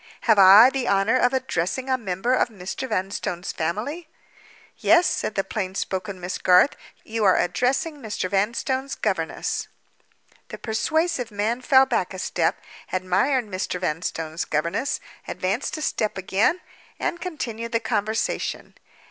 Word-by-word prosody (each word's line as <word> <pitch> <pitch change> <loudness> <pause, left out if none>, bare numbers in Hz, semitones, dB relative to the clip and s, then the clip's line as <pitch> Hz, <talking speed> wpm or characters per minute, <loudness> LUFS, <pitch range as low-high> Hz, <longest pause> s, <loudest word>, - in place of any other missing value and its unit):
"Have 220 -4 +4
I 200 +6 +9
the 265 -3 -2
honor 200 +4 +3
of 245 - +3
addressing 260 -2 -2
a 260 - +2
member 205 0 -1
of 255 - +3
Mr. 205 +5 -6
Vanstone's 190 -1 -3
family?" 240 - -3 0.7
"Yes," 345 +1 +5
said 215 - -1
the 195 - +1
plain 190 -3 -4
spoken 190 0 -3
Miss 180 +1 -4
Garth. 180 +9 +5 0.3
"You 225 0 -3
are 190 -2 +5
addressing 270 - 0
Mr. 215 -8 -3
Vanstone's 235 +8 -1
governess." - - -2 0.8
The - - -8
persuasive 310 +3 -1
man 215 +4 -1
fell 265 0 +5
back - - -1
a - - -6
step—admired 190 +8 -1
Mr. 185 -2 -3
Vanstone's 165 -1 -3
governess—advanced 170 - -3
a 310 - -4
step 215 -9 -1
again—and 220 - -2
continued 235 -10 -5
the 230 - +1
conversation. 220 0 -2
220 Hz, 130 wpm, -24 LUFS, 185-260 Hz, 0.8 s, I